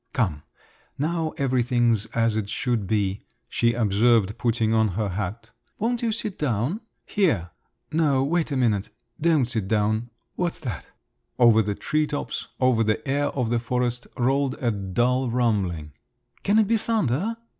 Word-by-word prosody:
"Come, 90 - 0 0.6
now 160 +2 0
everything's 120 -4 +2
as 115 -1 +1
it 105 -2 -2
should 115 -4 -1
be," 100 -1 -1 0.2
she 115 0 +1
observed, 110 -1 +3
putting 115 -2 +1
on 110 -1 +4
her 105 -2 0
hat. 105 +4 -4 0.3
"Won't 235 +2 -1
you 230 -2 +1
sit 215 -3 -3
down? 135 - -1 0.2
Here! 115 - +1 0.4
No, 150 -4 +2
wait 160 +2 0
a 140 - 0
minute… 110 -6 +1 0.3
don't 155 -5 +3
sit 115 -5 -2
down! 110 +2 +1 0.3
What's 175 -2 -2
that?" 105 - -5 0.5
Over 115 -2 +6
the 105 -1 -2
tree 155 +6 0
tops, 145 - -4
over 130 -3 +3
the 110 +5 -1
air 140 +2 +1
of 125 -4 -2
the 120 - +2
forest, 120 0 -1
rolled 135 +2 +1
a 125 -5 0
dull 120 +6 0
rumbling. 100 -11 0 0.5
"Can 205 +2 +2
it 220 -2 +4
be 230 +1 +3
thunder?" 215 - 0
120 Hz, 155 wpm, -25 LUFS, 110-145 Hz, 0.6 s, Over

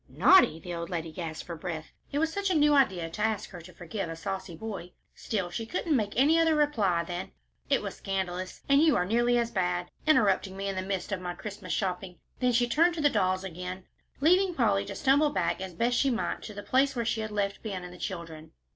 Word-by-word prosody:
"Naughty?" 370 - +5
The 175 +1 -7
old 170 0 -4
lady 165 -2 -3
gasped 160 -1 -6
for 170 - -6
breath; 160 -1 -6 0.2
it 285 - -2
was 320 +1 +1
such 400 +1 -1
a 365 - +1
new 295 -1 +5
idea 190 -12 +3
to 210 - -6
ask 215 -1 -1
her 180 -3 -9
to 175 +3 -13
forgive 175 +2 -5
a 165 - -5
saucy 190 0 -5
boy; 190 -2 -7 0.2
still, 195 -6 -3
she 225 +5 -4
couldn't 325 +1 0
make 210 -5 0
any 300 +6 +4
other 325 -1 +4
reply 215 - +2
than 175 +2 -6 0.4
"It - - +2
was - - -5
scandalous, 185 -2 -4
and 280 +1 +5
you 315 -2 +5
are 180 - +2
nearly 240 +4 +2
as 235 -1 0
bad, 180 -2 -1 0.2
interrupting 200 -9 +3
me 195 0 -3
in 195 - -2
the 185 - -1
midst 190 +1 -3
of 190 -2 -2
my 175 -1 -4
Christmas 200 -1 -7
shopping." 180 -2 -2 0.2
Then 250 -1 +2
she 240 +1 +3
turned 330 +7 +3
to 320 - -3
the 290 -1 +4
dolls 185 0 +1
again, 180 +1 -6 0.4
leaving 360 +4 +4
Polly 205 -7 +2
to 200 0 -6
stumble 280 +6 +3
back 290 - -1
as 185 -2 -6
best 240 +5 +1
she 275 - +3
might 240 -3 -2
to 210 - -8
the 205 - -6
place 270 +4 +2
where 235 -1 -1
she 220 0 0
had 220 - -3
left 200 -1 -2
Ben 195 -5 -5
and 180 0 -9
the 180 - -13
children. 165 -4 -6
200 Hz, 235 wpm, -29 LUFS, 180-250 Hz, 0.4 s, Naughty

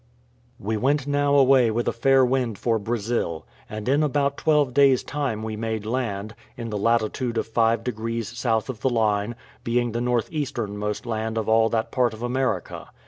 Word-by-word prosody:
We 110 +2 -2
went 135 +5 +1
now 145 0 +1
away 135 -3 +5
with 115 +2 -1
a - - +3
fair 135 +2 +4
wind 125 -4 0
for 115 +1 0
Brazil; 110 -6 -2 0.2
and 110 +1 -6
in 140 +3 +3
about 140 -1 +1
twelve 150 -5 +2
days' 135 -2 +4
time 135 -7 -3
we 110 -1 -4
made 110 -1 -3
land, 110 -3 -3 0.2
in 115 -2 -5
the 105 - -2
latitude 115 +2 0
of - - 0
five 115 0 +1
degrees 115 -2 -3
south 115 -2 -1
of 120 -5 -6
the 130 - +2
line, 110 -1 0 0.3
being 120 0 0
the 120 +2 -2
north 120 -1 0
easternmost 105 -9 -3
land 110 -1 -3
of 110 - -2
all 110 0 +4
that 110 -1 -1
part 120 -3 +1
of 110 - -9
America. 130 +2 -2
115 Hz, 185 wpm, -24 LUFS, 110-130 Hz, 0.3 s, away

